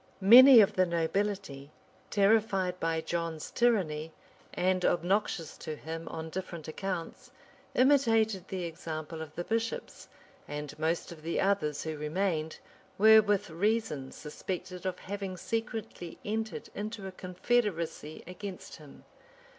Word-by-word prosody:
[*] - - -32
Many 240 +5 +10
of 200 - +3
the 185 -1 +2
nobility, 170 -3 -2 0.4
terrified 195 -3 +2
by 165 0 0
John's 165 -1 -4
tyranny, 165 -10 +1 0.4
and 185 0 0
obnoxious 175 -2 0
to 155 - -5
him 160 +2 -7
on 160 0 -6
different 175 -3 -6
accounts, 175 +1 -5 0.5
imitated 225 -8 +3
the 185 -2 -4
example 160 -1 -6
of 155 -1 -9
the 175 - -3
bishops; 225 +3 -3 0.4
and 150 -1 -5
most 165 +2 -1
of 165 -2 -10
the 165 +2 -2
others, 190 -7 +1
who 160 -1 -4
remained, 160 +1 -1 0.4
were 220 +2 +8
with 205 -3 0
reason 180 -7 -1
suspected 180 +4 -6
of 180 -1 -3
having 195 -1 -5
secretly 225 -4 -4
entered 220 +1 -3
into 210 -1 -5
a 190 - -5
confederacy 180 -4 -2
against 185 +1 -8
him. 150 -3 -15
185 Hz, 130 wpm, -30 LUFS, 160-205 Hz, 0.5 s, Many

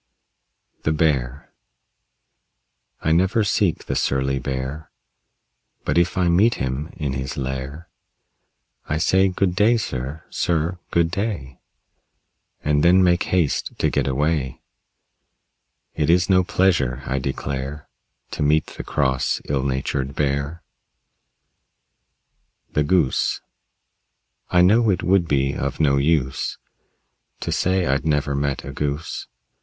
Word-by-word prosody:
THE 75 - 0
BEAR 70 -4 0 1.5
I 80 - +1
never 95 +7 +3
seek 100 -3 +1
the - - -2
surly 70 0 0
Bear, 65 +4 -4 1.0
But - - 0
if 85 +2 0
I 90 -2 +2
meet 100 +7 +4
him 65 +4 -3
in 70 -5 -2
his 65 +4 -4
lair 65 +4 -4 1.0
I 75 - 0
say, 95 +4 +3
"Good 90 -1 0
day, 110 +5 +4
sir; 70 - -4
sir, 85 +1 0
good 85 -1 +2
day," 90 - -3 1.0
And 75 0 +2
then 90 +2 +6
make 90 -1 +3
haste 90 -6 0
to - - +1
get 70 -2 0
away. 70 0 -1 1.3
It 75 - 0
is 90 +3 +4
no 95 0 +5
pleasure, 85 -9 +1
I 70 - -1
declare, 70 +2 -4 0.4
To - - -5
meet 75 +2 +3
the - - -8
cross, 65 -3 0
ill 70 -2 0
natured 65 0 -2
Bear. 70 +3 -1 2.1
THE 75 - +2
GOOSE 75 -3 +1 1.1
I 90 -1 +4
know 110 +5 +4
it 90 -3 +1
would 90 -2 +3
be 70 -2 +1
of 70 0 -3
no 70 -3 +3
use 70 -2 0 0.8
To - - -3
say 95 0 +1
I'd 70 -2 +1
never 75 -2 0
met 70 -1 -2
a - - -6
Goose. 75 +2 -3
75 Hz, 125 wpm, -22 LUFS, 70-90 Hz, 2.1 s, then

